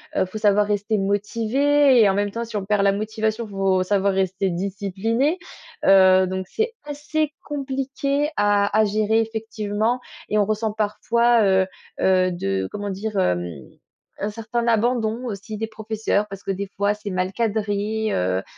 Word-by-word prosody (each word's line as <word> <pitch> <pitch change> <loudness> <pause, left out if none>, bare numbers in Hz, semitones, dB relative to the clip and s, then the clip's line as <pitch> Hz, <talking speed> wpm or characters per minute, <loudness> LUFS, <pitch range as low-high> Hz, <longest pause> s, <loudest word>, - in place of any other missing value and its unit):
heu, - - +2
faut 185 +4 -7
savoir 205 -1 +3
rester 210 +1 0
motivé 235 +7 +2
et 205 - +6
en - - +2
même 205 0 0
temps 235 +2 -3
si 230 -2 -9
on 195 - -4
perd 205 0 +1
la 200 - +4
motivation, 220 +2 -2
faut 195 -2 +1
savoir 200 0 +1
rester 190 0 0
discipliné, 200 - -1 0.5
heu, 190 -1 +6
donc, 190 0 -3
c'est 450 +1 -1
assez 295 +1 -2
compliqué 275 +1 -2
à 205 0 +2
à 220 - +5
gérer 215 +2 +2
effectivement 220 +1 -2 0.3
et 215 - +1
on 205 - +3
ressent 215 +1 -1
parfois, 230 +2 +2
heu, 190 -1 +3 0.3
heu, 185 -1 +3
de 95 - -2
comment 205 0 -4
dire? 205 +2 -4
Hem, 90 - +1 0.7
un 205 +1 -2
certain 230 +2 -3
abandon 230 +1 +1
aussi 210 -1 -6
des 225 +1 -3
professeurs 220 -1 -1
parce 195 0 -9
que - - -9
des 200 +1 -3
fois, 200 +1 +1
c'est 210 -1 -7
mal 185 +1 -1
cadré, 215 -1 -1
heu, 90 +1 0
heu, - - -8
210 Hz, 170 wpm, -22 LUFS, 195-230 Hz, 0.7 s, et